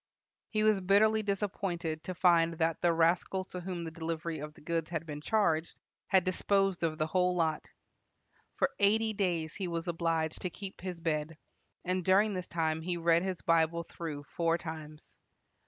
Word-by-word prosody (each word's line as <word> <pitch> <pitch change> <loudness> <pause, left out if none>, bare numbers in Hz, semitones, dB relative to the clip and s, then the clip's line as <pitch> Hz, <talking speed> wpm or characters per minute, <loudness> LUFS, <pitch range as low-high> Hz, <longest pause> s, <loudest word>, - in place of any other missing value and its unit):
He 215 -1 0
was 215 -2 +4
bitterly 215 +4 +4
disappointed 190 -6 -2
to 185 - -4
find 170 -2 +4
that 165 0 0
the 175 - +4
rascal 170 +3 +2
to 180 - -7
whom 180 -1 -4
the 165 - -5
delivery 165 0 -4
of 150 +1 -7
the - - -16
goods 165 0 -2
had 165 -1 -3
been 150 -2 -6
charged 165 -5 +1 0.3
had 190 -2 +4
disposed 195 0 +1
of 160 -2 0
the 155 - +1
whole 180 +2 +1
lot. 160 -3 0 0.9
For - - +1
eighty 220 +2 +3
days 175 -6 -1
he 195 -2 -4
was 170 0 -3
obliged 165 -2 -1
to 180 - -2
keep 195 +2 -9
his 180 -2 -5
bed, 155 -1 -2 0.5
and 185 0 0
during 200 +4 +4
this 185 -1 -4
time 160 -2 -1
he 175 +1 -2
read 170 0 +3
his 185 -1 -3
Bible 165 0 +2
through 155 -4 -6
four 165 +3 0
times. 155 -2 -9
170 Hz, 175 wpm, -31 LUFS, 160-185 Hz, 0.9 s, was